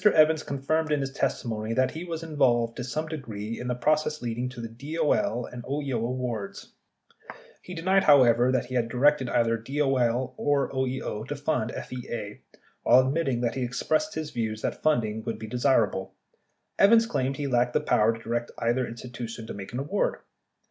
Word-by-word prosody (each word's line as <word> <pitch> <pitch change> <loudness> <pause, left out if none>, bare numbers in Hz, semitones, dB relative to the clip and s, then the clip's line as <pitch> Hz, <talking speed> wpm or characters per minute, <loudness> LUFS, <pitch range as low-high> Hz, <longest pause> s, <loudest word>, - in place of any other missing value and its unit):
Evans 160 -6 +5
confirmed 155 +3 -1
in 150 - +2
his 135 0 -3
testimony 110 -4 -2
that 130 +1 +2
he 160 +2 -6
was 165 -2 -5
involved 125 -7 +2
to 125 - -4
some 155 +6 -3
degree 115 -8 -5
in 125 - -5
the 125 - 0
processes 150 +4 +1
leading 120 +1 -3
to 125 -1 -10
the 115 - -4 0.3
DOL 165 - +1
and 125 +1 -8
OEO 140 0 -3
awards. 115 -3 -4 0.9
He 180 - -9
denied, 190 +3 +2
however, 125 -4 +6
that 130 -2 +1
he 125 0 0
directed 130 +3 +2
either 115 0 +2
DOL 130 -1 0
or 145 -1 +1
OEO 130 -5 -2
to 145 - -3
fund 140 -6 -1
FEA. 120 -4 -6 0.4
While 130 +1 +6
admitting 135 -5 0
that 120 -1 0
he 130 - -3
expressed 155 +10 0
his 155 -1 -4
view 110 -2 -2
that 110 - -4
funding 110 -8 +1
would 115 -2 -3
be 110 - -7
desirable, 115 -4 +1 0.6
Evans 225 +3 +6
claimed 135 - -1
he 145 - -3
lacked 125 -2 +1
the - - +3
power 110 +1 +3
to 115 0 -8
direct 120 +1 -2
either 120 +2 0
institu 120 0 -7
tion 115 -1 -7
to - - -6
make 100 -1 -8
an 120 - -4
award. 145 +10 -1
125 Hz, 180 wpm, -27 LUFS, 115-150 Hz, 0.9 s, however